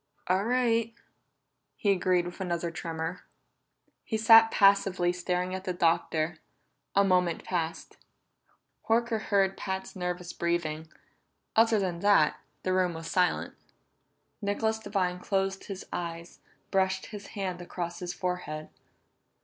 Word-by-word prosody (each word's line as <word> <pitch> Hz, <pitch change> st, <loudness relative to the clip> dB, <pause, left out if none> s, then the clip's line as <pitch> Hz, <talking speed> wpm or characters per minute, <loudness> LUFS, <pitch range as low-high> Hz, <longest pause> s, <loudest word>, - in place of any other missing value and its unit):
"All 185 Hz, +3 st, +1 dB
right," 230 Hz, -2 st, +1 dB, 0.8 s
he 200 Hz, -, +2 dB
agreed 180 Hz, -2 st, +2 dB
with 175 Hz, +2 st, -7 dB
another 170 Hz, -2 st, -2 dB
tremor. 165 Hz, +1 st, -4 dB, 0.8 s
He 220 Hz, -, -2 dB
sat 225 Hz, 0 st, +8 dB
passively 195 Hz, -4 st, +4 dB
staring 180 Hz, +1 st, -2 dB
at 190 Hz, 0 st, -4 dB
the 185 Hz, -, -2 dB
Doctor; 165 Hz, -1 st, +1 dB, 0.6 s
a 200 Hz, -, +6 dB
moment 180 Hz, -3 st, +2 dB
passed. 170 Hz, -2 st, -3 dB, 0.9 s
Horker 230 Hz, -1 st, +2 dB
heard 195 Hz, -2 st, +2 dB
Pat's 190 Hz, -1 st, -4 dB
nervous 180 Hz, -1 st, -4 dB
breathing; 160 Hz, -2 st, -2 dB, 0.6 s
other 225 Hz, 0 st, +5 dB
than 185 Hz, -4 st, -1 dB
that, 200 Hz, -6 st, +4 dB, 0.2 s
the 185 Hz, -, 0 dB
room 180 Hz, -2 st, +1 dB
was 165 Hz, 0 st, -7 dB
in -, -, -5 dB
silence. 180 Hz, -1 st, +1 dB, 0.9 s
Nicholas 220 Hz, +2 st, 0 dB
Devine 185 Hz, -4 st, -1 dB
closed 195 Hz, 0 st, -1 dB
his 195 Hz, -2 st, -7 dB
eyes, 170 Hz, -1 st, -5 dB, 0.3 s
brushed 190 Hz, -1 st, +1 dB
his 205 Hz, -2 st, -8 dB
hand 185 Hz, -3 st, -3 dB
across 175 Hz, -1 st, -5 dB
his 180 Hz, -1 st, -4 dB
forehead. 180 Hz, -5 st, -4 dB
185 Hz, 125 wpm, -29 LUFS, 175-200 Hz, 0.9 s, sat